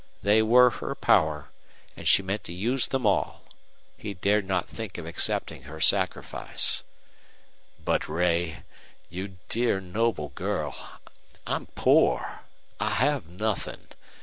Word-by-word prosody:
They 105 +2 +5
were 125 +3 +6
her - - -5
power, 75 -1 +2 0.5
and - - -5
she 95 - +5
meant 100 +3 -3
to 85 - -6
use 120 +8 0
them 130 -3 -1
all. 100 - +1 0.5
He 100 -1 -6
dared 100 +2 +1
not 95 -2 0
think 110 -4 -7
of 85 - -6
accepting 85 +1 -2
her 80 +1 -8
sacrifice. - - +2 1.0
"But - - 0
Ray 85 -2 0 0.5
you 95 +2 -6
dear, 115 -4 +1
noble 95 -4 -1
girl - - -3 0.7
I'm - - -2
poor. - - +3 0.4
I 105 +1 0
have 140 - +1
nothing. 105 +4 -4
100 Hz, 125 wpm, -27 LUFS, 85-110 Hz, 1.0 s, were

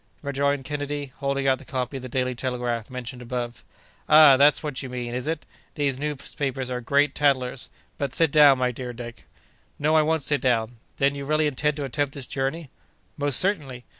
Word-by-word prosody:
rejoined 140 -1 0
Kennedy, 145 -1 -4
holding 140 -1 -1
out 130 -1 +3
the - - -12
copy 130 0 -3
of - - -7
the 130 - -7
Daily 130 +1 -1
Telegraph, 120 -2 -3
mentioned 125 0 -7
above. 120 0 -5 0.5
"Ah! 150 -3 +9
that's 145 +4 +4
what 145 -4 -3
you 135 - -6
mean, 120 -1 -5
is 125 +3 -3
it? 160 -1 -3 0.3
These 140 -3 -1
newspapers 135 -2 -3
are 125 0 -3
great 140 +4 +2
tattlers! 130 -4 +1 0.3
But, 140 -3 -2
sit 165 -3 +3
down, 145 -3 +7
my 125 -1 +1
dear 125 0 -6
Dick." 120 0 -9 0.5
"No, 155 +2 +2
I 155 - +6
won't 160 -1 0
sit 145 0 +1
down!—Then, 120 +3 0
you 140 0 -6
really 155 +2 +2
intend 150 +1 0
to 145 - -3
attempt 140 +2 -2
this 140 -3 -5
journey?" 135 +3 -3 0.4
"Most 145 -3 +2
certainly! 145 -11 0
135 Hz, 190 wpm, -25 LUFS, 125-145 Hz, 0.5 s, Ah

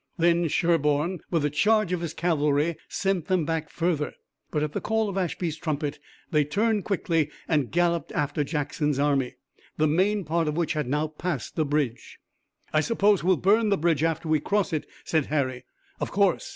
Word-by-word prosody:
Then 170 0 +3
Sherburne, 165 +1 +1
with 165 -4 +1
a 145 - 0
charge 215 +4 +2
of 175 - -1
his 170 -2 -4
cavalry, 150 -1 +1
sent 190 -4 -1
them 185 -5 +1
back 160 -1 -2
further. 165 -4 -1 0.3
But 150 - -1
at 150 - -2
the - - -2
call 220 0 0
of 195 - -5
Ashby's 175 -3 -2
trumpet 150 -3 -3 0.3
they 150 -2 +4
turned 205 +7 0
quickly 165 -6 0 0.2
and 150 -7 +1
galloped 170 -2 +1
after 145 +1 0
Jackson's 145 -1 -1
army, 140 -3 +1 0.4
the 155 - +3
main 190 +7 +2
part 165 0 0
of 150 +1 -1
which 170 -2 0
had 150 -4 -2
now 150 +4 +1
passed 155 -3 -4
the 155 - +1
bridge. 140 -5 -2 0.6
"I 155 - +4
suppose 205 -1 +2
we'll 185 0 +3
burn 215 +3 +3
the 200 - +3
bridge 165 -3 +1
after 165 0 0
we 155 -1 +3
cross 200 +3 0
it," 155 - -2 0.2
said 155 -4 +1
Harry. 130 -4 -1 0.3
"Of - - -2
course." 200 -3 +1
160 Hz, 185 wpm, -26 LUFS, 150-180 Hz, 0.6 s, they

